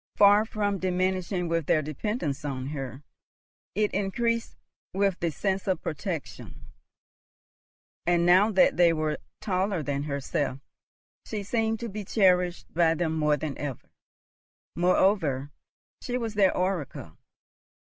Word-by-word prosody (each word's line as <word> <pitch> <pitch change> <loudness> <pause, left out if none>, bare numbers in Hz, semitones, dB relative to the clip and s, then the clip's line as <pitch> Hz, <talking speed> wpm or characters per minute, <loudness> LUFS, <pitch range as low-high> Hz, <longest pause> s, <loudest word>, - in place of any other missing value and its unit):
Far 205 +1 +6
from 205 -3 -1
diminishing 185 0 0
with 165 -2 -1
their 155 - +3
dependence 155 - -3
on 135 -2 -4
her, 135 -1 -6 0.7
it 210 0 +1
increased 230 +4 -1 0.4
with 195 -2 +1
the 170 - 0
sense 190 +5 -2
of 185 -3 0
protection; 160 0 -5 1.4
and, 175 -1 +3
now 185 +5 +6
that 190 -5 +4
they 170 -1 +5
were 155 -1 -1 0.2
taller 190 -3 0
than 140 -1 -2
herself, 140 -1 -2 0.7
she 210 -2 -4
seemed 225 +1 0
to 235 - -3
be 210 -1 -5
cherished 180 -3 +2
by 165 -1 +3
them 160 -1 -1
more 150 -1 +2
than 145 -1 -4
ever. 140 -4 -6 0.8
Moreover, 170 -6 +2 0.5
she 250 0 -2
was 230 -3 -3
their 200 -3 +3
oracle. 175 - -2
180 Hz, 130 wpm, -27 LUFS, 155-200 Hz, 1.4 s, Far